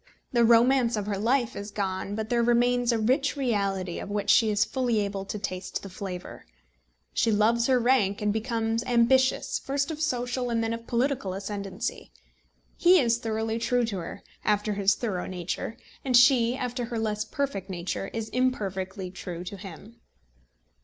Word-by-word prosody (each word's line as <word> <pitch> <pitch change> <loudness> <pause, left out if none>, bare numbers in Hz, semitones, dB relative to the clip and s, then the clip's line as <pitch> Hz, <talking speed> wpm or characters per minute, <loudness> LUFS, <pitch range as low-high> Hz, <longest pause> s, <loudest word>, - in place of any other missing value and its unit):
The 240 -3 +3
romance 235 +1 +4
of 205 - -2
her 200 -2 -2
life 245 +2 +1
is 205 +1 -6
gone, 195 -1 -3
but 220 0 -4
there 240 -1 +2
remains 240 +1 +3
a 230 - +1
rich 260 +7 +1
reality 200 -8 -1
of - - -7
which 205 0 +1
she 225 - +5
is 210 0 +2
fully 245 -4 0
able 200 -1 -2
to 210 - -4
taste 185 -3 -4
the 195 - -7
flavour. 180 - -7 0.7
She 230 - +2
loves 225 +3 +3
her 260 -1 +4
rank 240 -5 +2
and 210 -1 0
becomes 225 0 -1
ambitious, 260 +2 +3
first 280 +2 -1
of 310 -1 -6
social, 245 -3 -1
and 230 -1 0
then 225 0 -1
of 230 0 -7
political 240 -6 0
ascendancy. 200 - -5 0.7
He 360 +1 +6
is 235 -4 +2
thoroughly 225 0 -2
true 245 +1 +1
to 205 -4 -3
her, 165 - -8 0.2
after 210 0 +1
his 200 0 +3
thorough 195 -7 -3
nature, 185 +4 -4 0.3
and 255 -3 +4
she, 245 -1 +5
after 250 -1 -3
her 235 0 -4
less 215 -1 -1
perfect 220 -8 -3
nature, 185 +1 -3
is 225 -1 -4
imperfectly 195 -6 -2
true 180 -2 -6
to 185 - -7
him. 200 +4 -11
225 Hz, 175 wpm, -27 LUFS, 200-245 Hz, 0.7 s, He